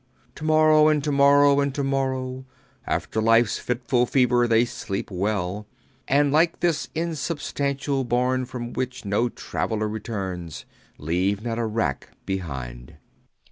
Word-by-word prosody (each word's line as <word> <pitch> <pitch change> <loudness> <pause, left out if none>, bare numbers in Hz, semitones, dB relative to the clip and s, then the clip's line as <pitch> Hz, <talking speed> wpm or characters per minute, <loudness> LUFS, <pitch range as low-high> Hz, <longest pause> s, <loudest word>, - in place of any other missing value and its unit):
To 155 - -11
morrow 155 -1 +5
and 150 -2 +2
to 150 - -1
morrow 140 0 +5
and 140 -1 0
to 140 - -1
morrow 130 -1 -2 0.4
After 110 - -1
life's 115 0 +3
fitful 125 0 0
fever 125 -2 +3
they 115 +1 +4
sleep 105 -4 -5
well 100 +1 -2 0.4
And 145 +1 +3
like 165 +3 +2
this 170 -3 0
insubstantial 145 -4 -2
bourne 125 +1 0
from 120 -1 -6
which 130 -2 -4
No 105 +5 +1
traveller 110 -2 -3
returns 95 -6 -5 0.3
Leave 95 +7 -1
not 115 -1 -3
a 115 - 0
wrack 110 - -2
behind. 65 -10 -5
125 Hz, 135 wpm, -24 LUFS, 105-140 Hz, 0.4 s, morrow